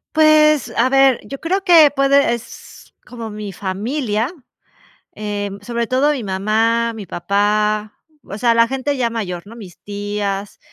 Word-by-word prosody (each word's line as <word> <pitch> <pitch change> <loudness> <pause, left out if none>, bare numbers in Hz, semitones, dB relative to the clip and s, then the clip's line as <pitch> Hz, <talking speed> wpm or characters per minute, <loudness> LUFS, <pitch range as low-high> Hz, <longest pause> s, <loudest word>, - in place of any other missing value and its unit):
Pues, 305 -2 +4
a 255 +3 +2
ver, 270 -2 +4
yo 275 - -8
creo 380 +4 -1
que 330 -6 +7
puede 275 -2 +3
es 235 +1 -10
como 230 -2 -8
mi 210 -2 -7
familia, 215 +5 -2 0.8
em, 205 -1 -5
sobre 235 +2 -3
todo 275 +5 +2
mi 255 -7 -4
mamá, 225 +4 0
mi 215 -3 -7
papá, 210 +4 0 0.3
o 200 - -8
sea, 235 0 +2
la 230 0 +4
gente 270 +3 -2
ya 240 -2 0
mayor, 190 -5 -5
¿no?, 225 - -12
mis 195 -7 -12
tías. 205 -1 -4
230 Hz, 150 wpm, -18 LUFS, 205-270 Hz, 0.8 s, que